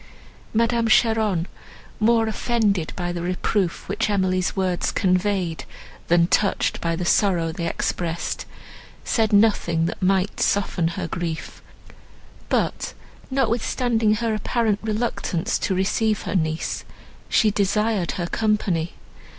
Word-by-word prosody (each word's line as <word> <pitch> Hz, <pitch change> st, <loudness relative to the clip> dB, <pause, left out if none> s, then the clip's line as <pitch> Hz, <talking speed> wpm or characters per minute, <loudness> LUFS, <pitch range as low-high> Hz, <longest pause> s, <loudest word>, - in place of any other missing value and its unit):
Madame 230 Hz, +1 st, +2 dB
Cheron, 220 Hz, -6 st, +3 dB, 0.5 s
more 225 Hz, +1 st, +3 dB
offended 215 Hz, -6 st, 0 dB
by 175 Hz, -1 st, -2 dB
the 175 Hz, -1 st, -4 dB
reproof 180 Hz, +1 st, -1 dB
which 210 Hz, +3 st, -1 dB
Emily's 185 Hz, -2 st, +1 dB
words 185 Hz, -2 st, 0 dB
conveyed, 185 Hz, -2 st, 0 dB, 0.4 s
than 170 Hz, 0 st, +4 dB
touched 195 Hz, +3 st, +1 dB
by 165 Hz, -1 st, 0 dB
the 175 Hz, +1 st, -3 dB
sorrow 175 Hz, -4 st, +2 dB
they 170 Hz, +1 st, -3 dB
expressed, 170 Hz, 0 st, -2 dB, 0.6 s
said 225 Hz, -2 st, +1 dB
nothing, 200 Hz, -6 st, +3 dB
that -, -, -4 dB
might 190 Hz, +1 st, +1 dB
soften 195 Hz, -4 st, +1 dB
her 165 Hz, 0 st, -3 dB
grief; 165 Hz, -1 st, -5 dB, 0.9 s
but, -, -, -1 dB, 0.3 s
notwithstanding 235 Hz, -3 st, +1 dB
an 230 Hz, 0 st, 0 dB
apparent 215 Hz, 0 st, 0 dB
reluctance 215 Hz, -5 st, -1 dB
to 190 Hz, -, 0 dB
receive 210 Hz, +3 st, +1 dB
her -, -, -3 dB
niece, 160 Hz, -2 st, -1 dB, 0.5 s
she 215 Hz, -, +4 dB
desired 205 Hz, -1 st, +1 dB
her 175 Hz, -, -2 dB
company. 185 Hz, -5 st, 0 dB
200 Hz, 120 wpm, -23 LUFS, 175-220 Hz, 0.9 s, than